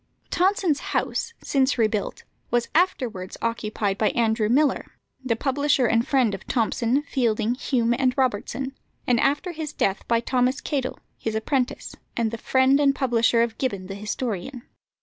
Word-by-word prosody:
Tonson's 365 -4 +2 0.2
house, 465 - -2
since 270 -1 +1
rebuilt, 215 -3 0 0.3
was 240 0 0
afterwards 250 - 0
occupied 215 -3 -2
by 215 - +3
Andrew 220 -2 +2
Millar, 285 +5 +2 0.3
the 245 -3 +1
publisher 275 +1 +1
and 230 +1 +2
friend 255 -7 +2
of 195 - -7
Thomson, 235 +3 +1
Fielding, 235 -5 0
Hume, 245 -2 +1
and 255 +1 +1
Robertson, 260 +2 -1 0.3
and 245 -2 +3
after 290 +8 +1
his 310 -2 -5
death 195 +1 -1
by 230 -1 +3
Thomas 255 +3 +1
Cadell, 265 -3 -2 0.2
his 220 -1 -3
apprentice, 250 +3 -1 0.2
and 230 -2 +1
the 230 - -5
friend 260 +3 +3
and 280 -1 +3
publisher 235 -3 +3
of 230 -2 -4
Gibbon 200 -8 -2
the 195 - -6
historian. 215 +3 -4
245 Hz, 150 wpm, -24 LUFS, 225-270 Hz, 0.3 s, by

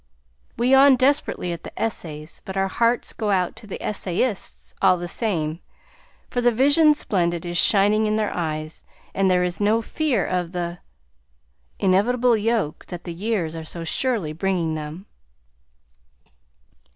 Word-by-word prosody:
We 240 +2 +1
yawn 270 +1 +7
desperately 255 -9 +1
at 170 - -7
the - - -10
essays, 155 -8 -4
but 190 0 -6
our 195 0 +2
hearts 235 +4 0
go 215 -2 -3
out 185 -3 +1
to 220 - -12
the 195 - -6
essayists, 200 +2 -2
all 180 - +5
the 175 0 -5
same, 165 -7 -1 0.7
for 245 - -2
"the 240 0 +4
vision 290 +6 +4
splendid" 175 - -1
is 175 0 0
shining 210 +1 +4
in 215 - +1
their 215 -1 -1
eyes, 155 -2 -3 0.3
and 195 -1 +2
there 180 -1 +3
is 180 -1 -2
no 215 +2 +3
fear 305 +1 0
of 180 -1 -2
"th' 175 -1 -4 1.0
inevitable 235 +6 +3
yoke" 215 -7 -1
that 175 -2 -7
the 170 - -6
years 180 -3 -2
are 160 - -6
so 165 +1 -7
surely 200 - 0
bringing 170 -1 -1
them. 155 +4 -6
195 Hz, 150 wpm, -23 LUFS, 170-230 Hz, 1.0 s, yawn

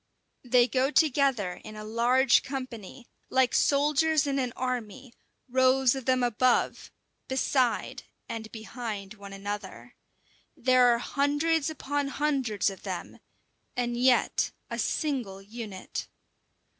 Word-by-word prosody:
They 245 -1 +4
go 260 +2 +1
together 270 - +2
in 215 0 -9
a 215 - -7
large 240 +4 +3
company, 255 -4 -7 0.2
like 260 -2 +2
soldiers 300 +1 +3
in 275 -1 0
an 250 -2 -1
army, 255 0 -4 0.3
rows 260 0 +4
of 265 -3 -6
them 255 -1 +2
above, 245 +1 +1 0.4
beside, 260 -2 0 0.3
and 225 -1 -6
behind 220 -3 -6
one 200 -2 -11
another. 205 +1 -6 0.6
There 255 0 +4
are 240 -1 +4
hundreds 290 +5 0
upon 290 -2 -2
hundreds 270 -9 0
of 195 - -11
them, - - -6 0.6
and 240 -1 -1
yet 250 +1 +3 0.2
a - - -3
single 250 - -2
unit. 205 -1 -7
250 Hz, 120 wpm, -28 LUFS, 225-270 Hz, 0.6 s, They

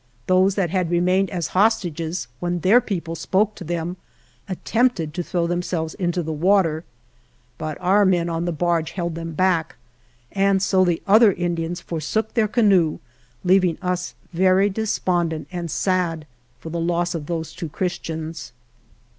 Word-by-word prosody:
Those 185 +1 +3
that 180 -5 0
had 180 -3 0
remained 180 +3 +2
as 175 -4 -3
hostages, 180 -5 0
when 175 -1 -2
their 220 +9 +5
people 170 -7 -4
spoke 195 +6 +1
to - - -9
them, 175 +2 -3 0.5
attempted 190 -4 0
to 180 - -2
throw 175 0 -1
themselves 175 -2 -2
into 175 -2 -1
the 160 0 -3
water. 165 -1 +2 0.8
But 155 -1 -4
our 200 +3 +4
men 180 -3 +2
in 165 0 -2
the 175 - 0
barge 165 0 0
held 170 -2 -3
them 165 -1 -6
backj 180 -2 +1 0.6
and 195 0 +2
so 190 -1 +3
the 175 -2 0
other 215 +1 +6
Indians 175 -1 -2
forsook 175 +7 -2
their 225 -3 +2
canoe, 195 -8 +3 0.5
leaving 185 -2 +3
us 180 -1 -3 0.2
very 190 +3 +3
despondent 180 -6 -1
and 175 -2 -4
sad 170 -2 0 0.3
for 160 +5 -8
the 170 - -2
loss 175 +1 0
of 155 -4 -5
those 165 -2 -4
two 165 - -6
Christians. 160 -3 -4
175 Hz, 155 wpm, -22 LUFS, 165-190 Hz, 0.8 s, other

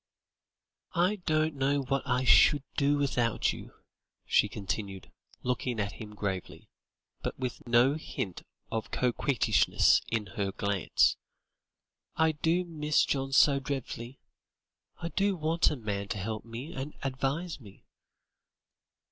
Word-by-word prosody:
"I 180 +5 +2
don't 155 0 +2
know 140 0 +1
what 135 +1 0
I 125 0 +1
should 130 +5 +6
do 145 0 +2
without 125 -5 +1
you," - - -11 0.5
she - - +3
continued, 100 -1 -5 0.3
looking 125 -1 -1
at 100 -1 -1
him 105 0 -10
gravely, 95 -3 -5 0.5
but - - -4
with 125 -1 -5
no 120 +3 +5
hint 105 - -5 0.3
of 110 -1 -3
coquettishness 125 0 +3
in 110 -2 -1
her 100 +1 -3
glance. 100 -2 +2 1.0
"I 160 0 +3
do 165 +4 0
miss 155 -3 +1
John 135 -1 -1
so 140 0 +5
dreadfully; 130 -2 -5 0.8
I 170 - -4
do 200 +2 +1
want 165 +1 +2
a - - -2
man 105 -5 -4
to 105 - -3
help 110 +2 -4
me 115 +6 -7
and 135 +3 -6
advise 140 +6 -2
me." 100 -6 -15
130 Hz, 130 wpm, -30 LUFS, 110-150 Hz, 1.0 s, should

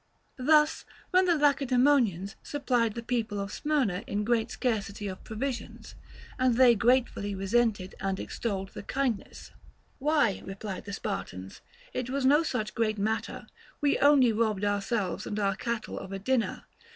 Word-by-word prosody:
Thus, 300 +3 +4 0.3
when 370 0 +5
the 345 -2 +3
Lacedaemonians 260 - +2
supplied 245 -6 0
the 235 - -5
people 230 -4 -2
of 200 +1 -4
Smyrna 265 -12 0
in 205 +1 -1
great 230 +1 +1
scarcity 210 -5 -2
of 185 -1 -7
provisions, 245 +3 -5 0.5
and 255 -2 +3
they 250 -1 +7
gratefully 230 -3 +1
resented 200 -1 0
and 195 0 -2
extolled 195 -4 -3
the - - -8
kindness; 250 0 -3 0.5
Why, 290 -7 +2
replied 195 0 -6
the 200 - -6
Spartans, 95 - -5 0.3
it 250 -1 -3
was 270 0 -1
no 290 +4 +6
such 250 -9 -2
great 215 -2 0
matter, 220 +2 -2 0.3
we 290 -1 +2
only 280 -4 +6
robbed 215 -2 0
our 205 0 +1
selves 195 -3 -2
and 210 - -3
our 200 -2 +1
cattle 235 0 -4
of 190 - -9
a 195 - -3
dinner. 230 +4 -1
230 Hz, 150 wpm, -28 LUFS, 200-260 Hz, 0.5 s, they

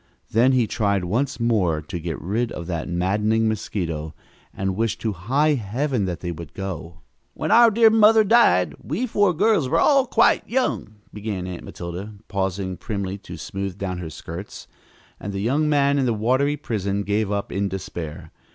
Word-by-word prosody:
Then 120 +4 +4
he 125 -3 +3
tried 100 -3 0
once 125 +10 -1
more 105 -9 +1
to 85 +3 -6
get 85 -1 -4
rid 110 +6 -1
of 85 - -6
that 85 -1 -4
maddening 105 +6 +1
mosquito 85 -8 -3 0.4
and 95 -1 -2
wished 115 +1 -1
to 110 -2 -1
high 135 - +1
Heaven 125 0 -1
that 90 -2 -4
they 85 - -3
would 85 -2 -9
go! 85 -4 -6 0.3
"When - - -2
our 235 0 +8
dear 225 +1 +5
mother 220 0 +6
died 195 - +4
we 175 - -2
four 205 -5 +2
girls 180 - +2
were 165 +4 +2
all 275 -3 +4
quite 230 0 +3
young," 245 - -1 0.2
began 105 -3 -4
Aunt 90 -1 -6
Matilda, 90 +5 -7
pausing 95 -2 -2
primly 100 -2 -4
to - - -9
smooth 95 -1 -5
down 95 -2 -3
her 85 -3 -5
skirts, 85 +5 -8 0.5
and 100 - -5
the 100 - -3
young 145 +8 +1
man 140 -1 +3
in 130 - +1
the 115 - +1
watery 130 +7 +1
prison 100 -6 -2
gave 105 +1 0
up 100 0 -2
in 100 +1 -1
despair. 85 -4 -6
105 Hz, 180 wpm, -23 LUFS, 90-135 Hz, 0.5 s, our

